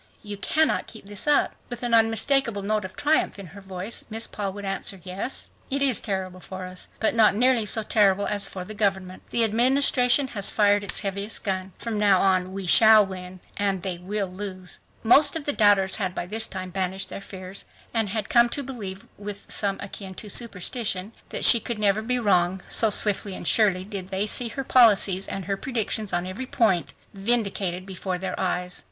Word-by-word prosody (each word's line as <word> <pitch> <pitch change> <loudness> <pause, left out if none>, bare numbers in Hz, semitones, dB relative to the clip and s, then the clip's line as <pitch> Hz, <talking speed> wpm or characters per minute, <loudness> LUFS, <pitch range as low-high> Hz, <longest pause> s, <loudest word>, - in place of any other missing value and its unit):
You 205 -1 -6
cannot 315 +10 0
keep 220 -3 -11
this 205 +6 -1
up!" 295 -1 +3 0.2
With 245 0 -7
an 240 -1 -2
unmistakable 225 0 +2
note 210 0 -1
of 185 - -9
triumph 300 -5 +1
in 200 - -9
her 200 - -11
voice 190 +3 -3
Miss 225 +1 -1
Paul 200 -2 -4
would 205 0 -8
answer, 195 0 -3
"Yes, 190 +8 -3 0.2
it 275 0 0
is 265 -5 +3
terrible 190 -3 -4
for 185 0 -8
us, 185 0 -9
but 220 - +1
not 220 -3 +4
nearly 245 -1 +3
so 220 +2 +1
terrible 205 -2 +2
as 205 -1 +1
for 185 -1 -7
the 215 - -7
government. 195 -3 -2
The 235 - +3
Administration 250 +3 +3
has 200 -4 +2
fired 205 -1 +3
its 200 - 0
heaviest 200 +2 -3
gun. 190 -1 -3
From 225 -3 -4
now 200 -3 +4
on 185 -1 +1
we 195 0 -6
shall 220 +3 +6
win 185 -1 -9 0.2
and 195 -3 -1
they 185 -3 -4
will 200 +3 -3
lose." 185 -1 -7 0.2
Most 280 +6 +5
of 315 -3 -4
the 290 - 0
doubters 205 -4 +3
had 185 -4 -2
by - - -3
this 220 +4 -2
time 185 -1 -6
banished 190 +1 -2
their - - -7
fears 190 0 -9 0.3
and 225 -3 0
had 210 0 -3
come 235 0 +4
to 285 - -4
believe 205 -8 -7
with 205 0 -8
something 200 -1 -1
akin 195 -1 -9
to 210 - -9
superstition 210 -1 0 0.2
that - - -1
she 235 - +7
could 235 +1 -4
never 210 0 +1
be 250 +3 -1
wrong, 185 -4 +1
so 225 - +4
swiftly 205 -1 +2
and - - -6
surely, 195 -5 +3
did 195 -3 -7
they 195 +1 -1
see 235 +3 +2
her 270 +4 -5
policies 205 -7 +4
and 195 - -5
her 195 - -1
predictions 220 -3 -3
on 175 0 -1
every 200 +8 -6
point 215 -10 +1 0.2
vindicated 195 -4 0
before 190 -1 -4
their 185 0 -5
eyes. 180 -1 -1
205 Hz, 200 wpm, -24 LUFS, 190-225 Hz, 0.3 s, she